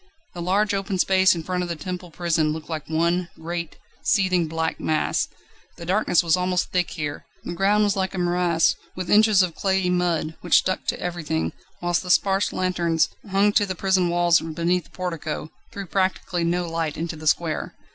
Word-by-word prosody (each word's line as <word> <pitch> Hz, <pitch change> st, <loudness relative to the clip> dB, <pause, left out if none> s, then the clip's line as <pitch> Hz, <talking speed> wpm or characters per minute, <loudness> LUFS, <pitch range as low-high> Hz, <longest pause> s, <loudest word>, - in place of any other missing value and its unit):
The 175 Hz, -, -6 dB
large 200 Hz, +4 st, +1 dB
open 195 Hz, -1 st, -2 dB
space 190 Hz, 0 st, +4 dB
in 165 Hz, -, -5 dB
front 180 Hz, +1 st, -2 dB
of 180 Hz, -, -3 dB
the 170 Hz, -, -2 dB
Temple 180 Hz, +2 st, -6 dB
Prison 160 Hz, -2 st, 0 dB
looked 160 Hz, 0 st, -8 dB
like 155 Hz, -2 st, -5 dB
one 170 Hz, +2 st, +1 dB
great, 170 Hz, 0 st, -5 dB, 0.2 s
seething, 185 Hz, -4 st, +2 dB
black 160 Hz, +1 st, -2 dB
mass. 155 Hz, -, 0 dB, 0.5 s
The 170 Hz, -, -8 dB
darkness 185 Hz, -1 st, +2 dB
was 165 Hz, -2 st, +3 dB
almost 180 Hz, -1 st, -1 dB
thick 180 Hz, -1 st, +1 dB
here, 150 Hz, -3 st, -5 dB, 0.2 s
the 175 Hz, -, -5 dB
ground 205 Hz, +3 st, +2 dB
like 190 Hz, -1 st, -2 dB
a -, -, -4 dB
morass, 175 Hz, -2 st, +2 dB, 0.2 s
with 185 Hz, -1 st, -4 dB
inches 210 Hz, -2 st, +6 dB
of 175 Hz, -2 st, -2 dB
clayey 190 Hz, -1 st, 0 dB
mud, 175 Hz, -3 st, 0 dB
which 175 Hz, -, +4 dB
stuck 185 Hz, -, 0 dB
to -, -, -1 dB
everything, 155 Hz, -, -2 dB, 0.3 s
whilst 175 Hz, -1 st, +1 dB
the 180 Hz, -, -8 dB
sparse 195 Hz, +2 st, +3 dB
lanterns, 170 Hz, -3 st, +1 dB, 0.2 s
hung 200 Hz, +2 st, +3 dB
to 205 Hz, -, +3 dB
the 190 Hz, -, -3 dB
prison 190 Hz, -1 st, +2 dB
walls 175 Hz, -1 st, +3 dB
and 160 Hz, -1 st, -6 dB
beneath 175 Hz, +1 st, +1 dB
the -, -, -20 dB
portico, 160 Hz, -4 st, -4 dB, 0.2 s
threw 200 Hz, -, -6 dB
practically 185 Hz, -1 st, -1 dB
no 175 Hz, +1 st, 0 dB
light 165 Hz, -2 st, -2 dB
into 165 Hz, 0 st, -3 dB
the 155 Hz, 0 st, -7 dB
square. 160 Hz, +1 st, 0 dB
175 Hz, 190 wpm, -23 LUFS, 165-185 Hz, 0.5 s, inches